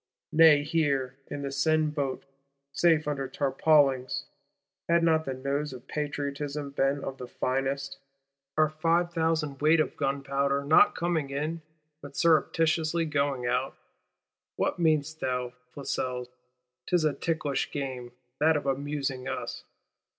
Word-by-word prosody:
Nay 155 -2 +7
here, 140 -5 0
in 140 - -5
this 140 0 -4
Seine 155 0 +2
Boat, 140 -4 -3 0.5
safe 160 -2 +3
under 140 -2 -2
tarpaulings 135 -1 +2 0.6
(had 170 0 +4
not 160 -1 +3
the 135 - -2
nose 140 +2 -2
of 125 0 -11
Patriotism 145 -1 -3
been 135 0 0
of 135 0 -5
the 125 - -6
finest), 135 +2 -2 0.6
are 155 0 +5
"five 165 +3 +1
thousand 160 -4 0
weight 155 +2 +5
of 155 - 0
gunpowder;" 140 0 0
not 150 +3 +5
coming 165 -5 -1
in, 155 +4 -3 0.4
but 140 -1 -10
surreptitiously 165 0 +2
going 140 -4 -1
out! 125 +2 -1 0.8
What - - -1
meanest 155 -1 +1
thou, 125 -1 -2 0.2
Flesselles? 125 -3 -3 0.6
'Tis 175 -3 +2
a 150 - +2
ticklish 150 -1 -1
game, 130 -4 -5 0.3
that 155 +1 +4
of 145 - -5
"amusing" 135 -1 -2
us. - - -5
145 Hz, 130 wpm, -28 LUFS, 135-155 Hz, 0.8 s, Nay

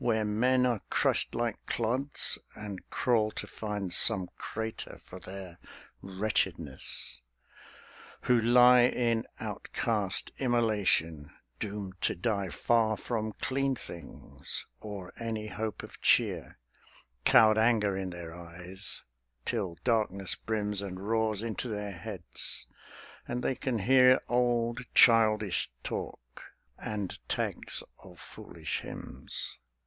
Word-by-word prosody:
Where 110 -3 +1
men 125 +5 +3
are 120 -5 +1
crushed - - +1
like 120 -2 -2
clods, 125 +5 0 0.2
and 105 -3 -8
crawl 115 -4 +2
to - - -4
find 105 -4 -4
Some 95 -4 +4
crater 110 0 -5
for 95 - -12
their 95 -2 -9 0.4
wretchedness; 95 - -1 1.0
who 125 -2 +3
lie 125 +2 +7
In 115 -2 0
outcast 105 -5 -1
immolation, 105 - +1 0.3
doomed 100 -3 -5
to - - +2
die 100 +1 -1
Far 110 +3 +2
from 110 -3 -3
clean 135 0 0
things 85 - -5
or 100 -4 -7
any 110 -2 -3
hope 110 0 -4
of - - -11
cheer, - - +2 0.7
Cowed 110 - +6
anger 110 -3 +3
in 95 -1 -3
their 85 -2 -7
eyes, 90 +3 -2 0.4
till 100 -8 -2
darkness 105 -6 +1
brims 105 -2 -2
And 95 -2 -5
roars 110 +1 0
into 115 +2 -3
their 105 -2 -3
heads, 95 -1 -3 0.6
and 125 +1 -3
they - - +1
can 130 -1 -2
hear 130 +4 +6
Old 120 -1 +1
childish 110 -4 +5
talk, - - -7 0.2
and 105 -3 -3
tags - - 0 0.2
of 90 -2 -15
foolish - - -5
hymns. - - -6
110 Hz, 115 wpm, -30 LUFS, 95-115 Hz, 1.0 s, lie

